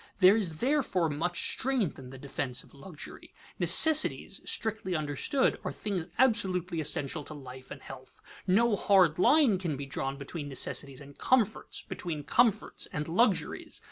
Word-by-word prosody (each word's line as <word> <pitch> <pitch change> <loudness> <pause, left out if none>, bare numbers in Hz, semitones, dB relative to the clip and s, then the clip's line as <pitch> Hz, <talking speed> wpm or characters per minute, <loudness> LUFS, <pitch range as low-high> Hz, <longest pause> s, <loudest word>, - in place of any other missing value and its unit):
There 190 +1 +6
is 175 -8 -2
therefore 240 - 0
much 175 +4 -1
strength 250 - -2
in 130 -1 -11
the 135 - -10
defense 130 -1 -3
of - - -20
luxury. 150 +2 -11 0.2
Necessities, 315 -1 +4
strictly 220 -5 -2
understood, 155 - 0
are - - -3
things 190 -6 -4
absolutely 185 -9 +1
essential 145 +1 0
to 155 - -8
life 130 -2 -11
and - - -10
health. 130 -1 -12 0.3
No 215 +4 +3
hard 185 -5 +3
line 265 - +4
can 165 -6 -3
be 140 - -6
drawn 135 0 -4
between 145 +1 -7
necessities 135 0 -1
and 140 0 -13
comforts, 225 -5 0
between 155 -4 -6
comforts 220 - +1
and 150 0 -5
luxuries. 200 +4 0
175 Hz, 150 wpm, -29 LUFS, 145-215 Hz, 0.3 s, There